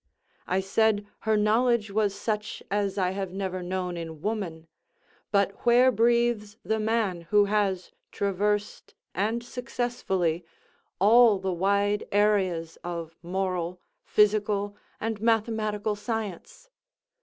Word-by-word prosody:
I 185 Hz, +1 st, +1 dB
said 205 Hz, +1 st, +2 dB, 0.2 s
her 215 Hz, -, +4 dB
knowledge 220 Hz, +1 st, +2 dB
was 205 Hz, -1 st, +1 dB
such 210 Hz, -1 st, -3 dB
as 200 Hz, -1 st, 0 dB
I 185 Hz, -2 st, +1 dB
have 190 Hz, -1 st, -4 dB
never 190 Hz, -1 st, -3 dB
known 180 Hz, 0 st, -3 dB
in 165 Hz, -2 st, -6 dB
woman—but 195 Hz, 0 st, -3 dB
where 245 Hz, +2 st, +6 dB
breathes 230 Hz, -2 st, +1 dB
the 220 Hz, 0 st, 0 dB
man 215 Hz, -5 st, 0 dB
who 205 Hz, -1 st, +5 dB
has 200 Hz, -3 st, 0 dB, 0.2 s
traversed, 205 Hz, +1 st, -1 dB, 0.2 s
and 220 Hz, +5 st, -1 dB
successfully, 235 Hz, -9 st, -2 dB, 0.5 s
all 220 Hz, +2 st, +6 dB
the 190 Hz, -1 st, -2 dB
wide 200 Hz, +3 st, +1 dB
areas 190 Hz, -6 st, +1 dB
of 170 Hz, -2 st, -5 dB
moral, 180 Hz, 0 st, -2 dB, 0.2 s
physical, 205 Hz, -1 st, +2 dB, 0.2 s
and 225 Hz, -1 st, -3 dB
mathematical 220 Hz, -2 st, 0 dB
science? 220 Hz, -, -5 dB
205 Hz, 110 wpm, -27 LUFS, 185-220 Hz, 0.5 s, where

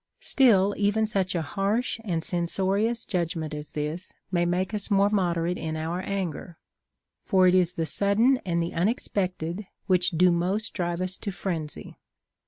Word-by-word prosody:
Still 205 Hz, -7 st, +4 dB
even 210 Hz, +2 st, +2 dB
such 195 Hz, -4 st, -1 dB
a 165 Hz, -, 0 dB
harsh 200 Hz, -, -1 dB
and 170 Hz, -6 st, -2 dB
censorious 195 Hz, +7 st, 0 dB
judg 175 Hz, -5 st, -1 dB
ment 160 Hz, -2 st, -4 dB
as 150 Hz, 0 st, -7 dB
this 150 Hz, +4 st, -4 dB, 0.2 s
may 175 Hz, -2 st, +2 dB
make 185 Hz, +4 st, -1 dB
us 210 Hz, 0 st, -2 dB
more 200 Hz, 0 st, +3 dB
moderate 175 Hz, -3 st, 0 dB
in 160 Hz, 0 st, -3 dB
our 165 Hz, +3 st, -2 dB
anger; 185 Hz, -3 st, -4 dB, 0.7 s
for 190 Hz, -3 st, +4 dB
it 180 Hz, -, +5 dB
is 180 Hz, -1 st, +3 dB
the 165 Hz, -2 st, -2 dB
sudden 220 Hz, +9 st, +2 dB
and 170 Hz, -2 st, 0 dB
the 170 Hz, -, -4 dB
unexpected 185 Hz, -1 st, -1 dB, 0.2 s
which 185 Hz, -1 st, +3 dB
do 180 Hz, +1 st, +4 dB
most 185 Hz, +5 st, -1 dB
drive 175 Hz, -2 st, -2 dB
us 185 Hz, 0 st, -3 dB
to 205 Hz, -, -4 dB
frenzy. 165 Hz, -4 st, -5 dB
185 Hz, 165 wpm, -26 LUFS, 170-200 Hz, 0.7 s, it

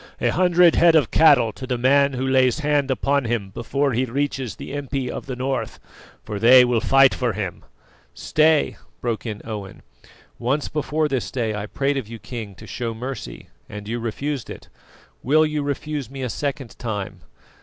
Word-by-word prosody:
"A -, -, +1 dB
hundred 180 Hz, -1 st, +4 dB
head 170 Hz, -1 st, +5 dB
of 150 Hz, -7 st, +3 dB
cattle 140 Hz, -8 st, +5 dB
to 130 Hz, -, -8 dB
the 125 Hz, -1 st, -1 dB
man 140 Hz, +3 st, +3 dB
who 130 Hz, +1 st, -2 dB
lays 130 Hz, -2 st, +3 dB
hand 145 Hz, -2 st, +1 dB
upon 140 Hz, +1 st, +1 dB
him 115 Hz, -4 st, -2 dB
before 135 Hz, +6 st, -1 dB
he 125 Hz, +3 st, +1 dB
reaches 135 Hz, -2 st, -2 dB
the -, -, -8 dB
impi 135 Hz, -3 st, -3 dB
of -, -, -7 dB
the 130 Hz, -, -4 dB
North, 130 Hz, +1 st, -3 dB, 0.4 s
for 105 Hz, -2 st, -5 dB
they 125 Hz, +3 st, +8 dB
will 120 Hz, -2 st, +1 dB
fight 135 Hz, +1 st, +5 dB
for 125 Hz, -3 st, -1 dB
him!" 95 Hz, -6 st, -5 dB, 0.5 s
"Stay!" 155 Hz, 0 st, +2 dB, 0.2 s
broke 120 Hz, -1 st, -3 dB
in 105 Hz, -2 st, -6 dB
Owen. 105 Hz, -4 st, -7 dB, 0.6 s
"Once 135 Hz, +5 st, -1 dB
before 155 Hz, +1 st, -1 dB
this 135 Hz, -5 st, -2 dB
day 115 Hz, -4 st, -2 dB
I 105 Hz, 0 st, -4 dB
prayed 140 Hz, +5 st, -1 dB
of 130 Hz, -6 st, -4 dB
you, 115 Hz, +1 st, -8 dB
King, 110 Hz, -4 st, -7 dB
to -, -, -12 dB
show 115 Hz, -2 st, -4 dB
mercy, 120 Hz, -, -7 dB, 0.2 s
and 105 Hz, 0 st, -8 dB
you 120 Hz, +2 st, -3 dB
refused 130 Hz, +4 st, -4 dB
it. -, -, -10 dB, 0.5 s
Will 155 Hz, +4 st, +4 dB
you 150 Hz, -1 st, -2 dB
refuse 145 Hz, -2 st, -3 dB
me 135 Hz, 0 st, -6 dB
a 125 Hz, -, -2 dB
second 135 Hz, -2 st, -4 dB
time? 105 Hz, -5 st, -5 dB
130 Hz, 185 wpm, -22 LUFS, 115-140 Hz, 0.6 s, they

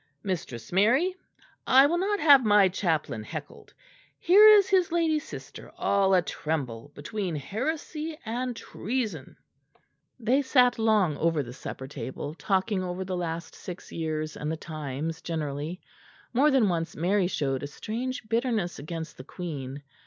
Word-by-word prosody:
Mistress 135 Hz, -, -4 dB
Mary, 245 Hz, -, +3 dB, 0.5 s
I 265 Hz, +2 st, +7 dB
will 340 Hz, +4 st, +1 dB
not 405 Hz, +2 st, 0 dB
have 285 Hz, -4 st, +7 dB
my 205 Hz, -3 st, +6 dB
chaplain 165 Hz, -, -1 dB
heckled; 145 Hz, +4 st, -8 dB, 0.5 s
here 405 Hz, +5 st, +7 dB
is 415 Hz, -2 st, +8 dB
his 375 Hz, -4 st, +2 dB
lady 325 Hz, -2 st, +2 dB
sister -, -, -10 dB
all 195 Hz, -1 st, +3 dB
a 180 Hz, -, +3 dB
tremble 145 Hz, -7 st, -4 dB
between 180 Hz, +3 st, -4 dB
heresy 300 Hz, -, -3 dB
and 245 Hz, +2 st, -2 dB
treason." 220 Hz, -, -4 dB, 0.8 s
They 250 Hz, +4 st, +2 dB
sat 250 Hz, -3 st, +3 dB
long 210 Hz, -8 st, +3 dB
over 165 Hz, -3 st, +1 dB
the 120 Hz, -1 st, -9 dB
supper 130 Hz, 0 st, -7 dB
table, 145 Hz, +1 st, -6 dB
talking 190 Hz, +3 st, 0 dB
over 180 Hz, +1 st, -4 dB
the 185 Hz, 0 st, -3 dB
last 170 Hz, -1 st, -4 dB
six 180 Hz, 0 st, -9 dB
years 155 Hz, -1 st, -3 dB
and 150 Hz, +1 st, -3 dB
the 160 Hz, -, -3 dB
times 155 Hz, 0 st, -5 dB
generally. 155 Hz, +1 st, -4 dB, 0.5 s
More 275 Hz, +5 st, +5 dB
than 265 Hz, -7 st, +4 dB
once 165 Hz, -2 st, -2 dB
Mary 185 Hz, +3 st, +2 dB
showed 135 Hz, -7 st, -1 dB
a 145 Hz, -, -4 dB
strange 235 Hz, -, -5 dB
bitterness 225 Hz, -, 0 dB
against 160 Hz, +2 st, -6 dB
the 130 Hz, -, -9 dB
Queen. 140 Hz, -4 st, -6 dB
185 Hz, 145 wpm, -27 LUFS, 155-250 Hz, 0.8 s, is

